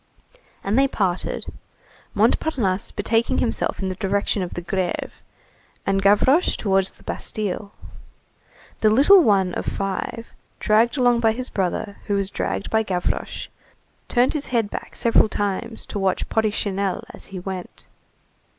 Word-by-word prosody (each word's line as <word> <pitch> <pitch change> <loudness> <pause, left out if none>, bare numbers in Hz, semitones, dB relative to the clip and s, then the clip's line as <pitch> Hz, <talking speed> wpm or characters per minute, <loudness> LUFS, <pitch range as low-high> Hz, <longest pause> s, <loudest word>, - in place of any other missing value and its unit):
And 205 +6 +2
they 275 - +5
parted, 190 -8 -2 0.7
Montparnasse 205 -12 +1
betaking 225 +3 0
himself 235 - -1
in 190 - -1
the - - -2
direction 200 +1 0
of 180 - -4
the 175 - -4
Grève, 180 0 -2 0.7
and 195 0 +1
Gavroche 210 - +4
towards 195 -2 +2
the - - -21
Bastille. 205 -1 -3 1.1
The 215 - +4
little 290 - +7
one 195 - +3
of - - -3
five, 195 +4 -3 0.3
dragged 225 +5 +3
along 245 -2 +4
by 225 -1 +3
his 255 +2 -5
brother 195 +2 -2
who 205 - +1
was 200 0 -1
dragged - - -3
by 220 - +3
Gavroche, 185 -5 -2 0.6
turned 245 +1 +2
his 300 -2 -2
head 230 -4 0
back - - -7
several 230 -2 +3
times 205 +3 -3
to 205 - -5
watch 190 -1 0
"Porrichinelle" 200 -3 0
as - - -7
he 195 - -8
went. 185 0 -7
205 Hz, 140 wpm, -22 LUFS, 195-230 Hz, 1.1 s, little